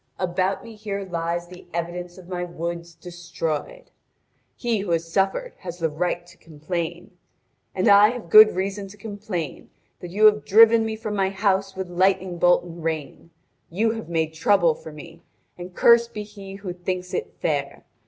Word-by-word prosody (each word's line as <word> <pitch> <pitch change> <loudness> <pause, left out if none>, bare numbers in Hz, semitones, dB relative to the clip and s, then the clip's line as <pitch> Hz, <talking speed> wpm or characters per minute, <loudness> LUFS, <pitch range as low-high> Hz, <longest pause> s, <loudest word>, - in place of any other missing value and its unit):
About 185 +1 -1
me 230 -1 -10
here 205 -2 -5
lies 170 0 -3
the 180 0 -13
evidence 175 +1 -4
of 185 -2 -13
my 180 -1 -3
woods 170 0 -5
destroyed. 170 - -5 0.6
He 235 -3 -1
who 195 -1 -5
has 165 0 -1
suffered 195 - 0
has 175 -2 -7
the 165 -3 -1
right 175 +2 -2
to 175 - -18
complain. 170 +3 -5 0.6
And 190 +3 +1
I 205 +1 +7
have 230 -8 -7
good 215 -2 +9
reason 195 +2 -3
to 200 +2 -14
complain 200 -6 -6 0.3
that 175 - -8
you 205 +5 +3
have 210 0 +5
driven 225 +2 +6
me 220 - -3
from 215 -1 -5
my 195 -1 +1
house 195 0 0
with 190 -1 -4
lightning 185 0 +1
bolt 175 0 +4
and 170 -1 -10
rain. 160 0 -4 0.4
You 220 +6 +1
have 225 -5 -6
made 160 -2 -1
trouble 175 -1 +3
for 160 - -11
me, 160 +2 -12 0.3
and 180 0 -10
cursed 235 -1 +5
be 210 - -3
he 200 -2 -11
who 195 -3 -6
thinks 180 0 -4
it - - -4
fair. 140 -3 -2
180 Hz, 175 wpm, -23 LUFS, 170-205 Hz, 0.6 s, good